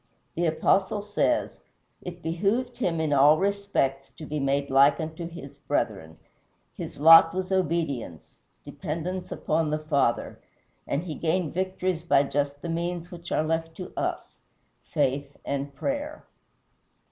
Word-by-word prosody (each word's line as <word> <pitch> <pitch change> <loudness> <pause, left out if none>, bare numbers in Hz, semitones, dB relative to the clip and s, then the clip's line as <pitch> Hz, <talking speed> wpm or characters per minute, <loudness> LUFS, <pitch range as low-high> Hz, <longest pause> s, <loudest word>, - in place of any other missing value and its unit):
The 170 0 0
Apostle 190 +5 +1
says, 210 +9 0 0.4
"It 175 -1 -8
behooved 205 +10 -1
him 175 -8 0
in 155 -2 0
all 145 +2 +6
respects 195 -9 -1
to 155 - -8
be 150 0 -3
made 140 0 0
like 140 +3 +5
unto 160 +1 -5
his 145 -5 -10
brethren." 100 - -2 0.6
His - - -8
lot 165 +2 +8
was 185 0 -3
obedience 145 - -2 0.3
dependence 180 +4 -5
upon 155 0 0
the 155 - 0
Father 145 -6 0 0.5
and 150 - -1
he 170 -4 -5
gained 165 +1 -1
victories 185 -1 -1
by 145 -4 +3
just 145 0 -2
the - - -3
means 170 +1 -3
which 175 -1 -9
are - - +2
left 165 +1 -2
to 185 - -7
us - - -3 0.5
faith 140 +2 -1
and 140 0 -3
prayer. 290 - -4
165 Hz, 140 wpm, -26 LUFS, 145-180 Hz, 0.6 s, lot